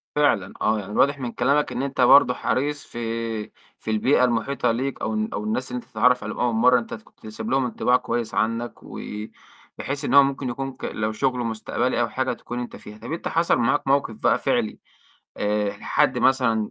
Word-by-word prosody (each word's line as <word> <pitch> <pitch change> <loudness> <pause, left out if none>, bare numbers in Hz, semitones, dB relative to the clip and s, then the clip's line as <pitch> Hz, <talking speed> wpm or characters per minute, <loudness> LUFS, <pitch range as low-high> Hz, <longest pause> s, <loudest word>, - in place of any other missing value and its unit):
فعلًا 115 -11 +2
آه. 110 0 +2
يعني 105 0 -8
واضح 140 +4 +3
من 120 -3 -4
كلامك 140 +4 +1
إن 130 - -2
أنت 140 -1 -2
برضه 125 0 +7
حريص 145 +4 -1
في 120 - -8 0.8
في 110 - -4
البيئة 125 +5 +3
المحيطة 120 +1 +1
ليك 130 +4 -3
أو - - -1
الن 215 +1 -1
أو - - -3
الناس 220 +2 -2
اللي 250 - -2
أنت 235 - -15
بتتعرّف 125 0 +3
عليهم - - -5
أول 120 -1 +1
مرّة، 125 +2 +5
أنت 115 - -8
كنت 110 0 -12
سايب 110 +1 -6
لهم 130 -1 +2
انطباع 125 +1 +2
كويس 120 -3 -3
عنّك، 115 +2 -1
وبحيث 135 +6 -7
إن - - -1
هو 140 0 +9
ممكن 135 -1 -2
يكون 135 +2 -4
ك - - -8
لو 110 0 -2
شُغل 125 +3 -1
مستقبلي 120 +2 -1
أو 115 - 0
حاجة 130 0 -1
تكون 120 +1 -7
أنت 120 - -6
فيها. 105 0 -11
طَب 115 +6 -9
أنت 165 - -4
حصل 165 +1 +2
معاك 120 +3 +1
موقِف 135 -5 +1
بقى - - +4
فعلي - - 0 0.6
آآ 105 0 0
ح - - -13
حد - - +2
مثلًا 115 -5 +2
125 Hz, 205 wpm, -24 LUFS, 110-135 Hz, 0.8 s, هو